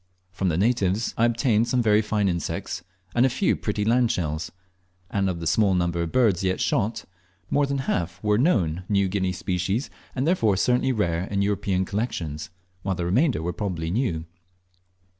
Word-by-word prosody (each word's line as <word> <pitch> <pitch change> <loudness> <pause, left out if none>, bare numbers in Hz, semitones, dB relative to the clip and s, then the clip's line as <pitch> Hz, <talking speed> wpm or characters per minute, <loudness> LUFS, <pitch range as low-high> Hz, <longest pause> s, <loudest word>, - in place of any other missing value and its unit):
From 90 +1 -1
the 80 - 0
natives 105 0 +1
I 115 - +3
obtained 115 -1 +2
some 125 -1 +1
very 105 -1 +4
fine 105 -1 0
insects 85 -1 -3 0.3
and 120 - +3
a 130 - +4
few 185 +10 +1
pretty 105 -1 -2
land 120 +1 +3
shells; 80 -2 -2 0.6
and 100 -1 +1
of 85 -2 -3
the 85 - -5
small 95 +3 +3
number 85 -1 0
of 85 -1 -3
birds 110 -8 +3
yet 95 0 0
shot 105 +4 0 0.5
more 145 0 +3
than 140 0 -1
half 90 -9 -2
were 105 0 +2
known 95 - +2
New 100 -2 +3
Guinea 95 -1 0
species, 95 - -2 0.2
and 130 +1 0
therefore 115 - +2
certainly 125 +5 +2
rare 90 -7 0
in 100 0 -1
European 100 -2 0
collections, 85 -8 -3 0.3
while 95 0 -1
the 85 0 -3
remainder 120 - +2
were 90 +1 -2
probably 85 -4 -3
new. 95 -8 -1
100 Hz, 180 wpm, -25 LUFS, 90-115 Hz, 0.6 s, very